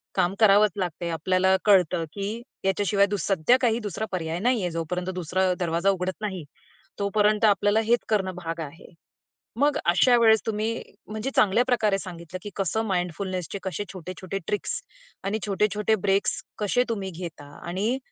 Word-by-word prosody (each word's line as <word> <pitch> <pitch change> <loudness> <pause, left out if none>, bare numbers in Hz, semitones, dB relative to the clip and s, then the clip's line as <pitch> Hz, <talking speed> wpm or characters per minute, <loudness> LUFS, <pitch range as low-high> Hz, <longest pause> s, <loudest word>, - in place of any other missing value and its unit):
काम 185 0 +2
करावंच 210 -1 +6
लागते. 175 -2 -3
आपल्याला 185 +3 +2
कळतं, 180 -4 +4
की 205 +3 -4 0.2
याच्याशिवाय 200 +1 +3
दुस 200 -3 -2
सध्या 195 +6 +4
काही 235 -1 +2
दुसरा 210 0 -4
पर्याय 165 -2 -2
नाही 240 +1 +2
आहे. 175 - -1
जोपर्यंत 180 +3 -3
दुसरा 185 +1 +1
दरवाजा 170 +2 +1
उघडत 185 -1 0
नाही 190 -6 -3 0.6
तोपर्यंत 210 +2 +2
आपल्याला 205 +1 +3
हेच 235 +1 +3
करणं 190 -4 0
भाग 165 -2 -5
आहे. 155 +2 -9 0.7
मग 290 0 +3
अशा 190 +9 +5
वेळेस 220 -2 +5
तुम्ही, 225 +1 -1 0.3
म्हणजे 215 +5 -3
चांगल्या 215 +4 +4
प्रकारे 215 -6 +2
सांगितलं 175 -1 -8
की 205 - -5
कसं 205 +3 0
माइंडफुलनेसचे 185 0 -2
कसे 190 +2 -3
छोटे-छोटे 185 +2 -6
ट्रिक्स 205 - -2 0.4
आणि 200 +3 -1
छोटे-छोटे 210 +2 +1
ब्रेक्स 195 +1 +1 0.2
कसे 215 +4 +2
तुम्ही 195 -4 -3
घेता? 165 -5 -7 0.2
आणि 205 +9 0
195 Hz, 150 wpm, -25 LUFS, 180-215 Hz, 0.7 s, करावंच